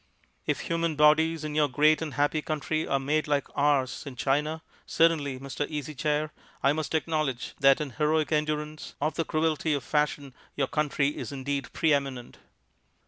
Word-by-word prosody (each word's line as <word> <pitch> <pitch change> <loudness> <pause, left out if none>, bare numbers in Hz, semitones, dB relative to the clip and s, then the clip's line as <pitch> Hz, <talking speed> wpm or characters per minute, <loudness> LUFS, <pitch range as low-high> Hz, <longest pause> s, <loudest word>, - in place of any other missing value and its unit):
If - - 0
human 165 -1 -1
bodies 155 +2 +4
in 155 -1 -4
your 150 -1 +3
great 150 +4 +3
and 155 -2 -4
happy 145 +2 +1
country 155 +1 -2
are 135 - +2
made 150 +3 0
like 145 -1 +1
ours 140 -3 +1
in 135 - -7
China, 150 +5 0 0.2
certainly, 150 -5 +2
Mr. 140 +2 -4
Easy 150 0 -4
Chair, 150 +1 -1 0.3
I 140 - +4
must 155 +1 -2
acknowledge 155 -5 -1
that 135 -1 +5
in 150 -3 -4
heroic 155 +2 +1
endurance 150 0 -2
of 155 +2 0
the 165 - -1
cruelty 155 -1 0
of 140 - -3
fashion 145 -2 -1 0.2
your 140 - +1
country 150 -2 +1
is 150 - -6
indeed 140 0 -3
pre 160 -2 +2
eminent." 135 -4 -3
150 Hz, 170 wpm, -27 LUFS, 140-155 Hz, 0.3 s, that